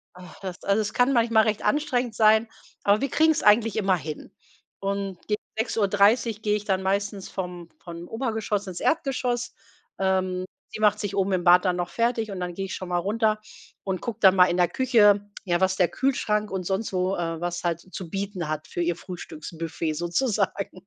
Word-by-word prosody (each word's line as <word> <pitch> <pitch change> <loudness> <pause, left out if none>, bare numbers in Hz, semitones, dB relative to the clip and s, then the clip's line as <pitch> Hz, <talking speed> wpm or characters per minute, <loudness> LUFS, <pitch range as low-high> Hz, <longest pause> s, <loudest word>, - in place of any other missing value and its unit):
Ach, 180 -2 -13
das 185 -2 -7
also, 200 +2 +2
es 210 - -4
kann 250 +2 +3
manchmal 230 -2 +4
recht 215 -1 -1
anstrengend 255 -6 0
sein, 220 +1 +4 0.3
aber 205 +1 +3
wir 275 0 -1
kriegen's 315 +2 +3
eigentlich 215 0 +4
immer 195 -4 +2
hin. 155 -1 -7 0.5
Und 195 -1 -3
gegen 210 0 0 0.2
6:30 220 0 +2
gehe 210 0 +1
ich 205 - -5
dann 190 -2 0
meistens 200 0 -1
vom 180 -2 -6
von 170 0 -9
Obergeschoss 220 -4 -2
ins 180 -2 -6
Erdgeschoss. 255 -5 0 0.5
Ähm, 185 -1 0 0.3
sie - - -6
macht 210 -1 +4
sich 205 -2 -4
oben 195 0 +1
im 180 -2 0
Bad 180 +1 +6
dann 180 -2 +1
noch 175 -1 -3
fertig, 230 -2 0
und 190 -2 -5
dann 180 -1 -4
gehe 195 - -4
ich 190 - -6
schon 185 - -6
mal 175 0 0
runter 215 +3 0 0.4
und 190 -3 -2
gucke 235 -2 -5
dann 190 -1 +7
mal 180 -1 +7
in 175 - 0
der 175 -2 +3
Küche, 205 -4 +3 0.2
ja, 175 -3 0
was 190 0 +2
der 180 -2 +3
Kühlschrank 215 -6 0
und 190 -1 -3
sonst 195 +4 -2
wo, 185 +1 0
äh 165 -1 -3
was 175 0 -3
halt 170 -1 -1
zu 185 -2 -9
bieten 195 -3 -4
hat 155 0 -3
für 175 - -3
ihr 170 0 0
Frühstücksbuffet 165 -2 -5
sozusagen. 195 - -1
195 Hz, 195 wpm, -25 LUFS, 180-220 Hz, 0.5 s, dann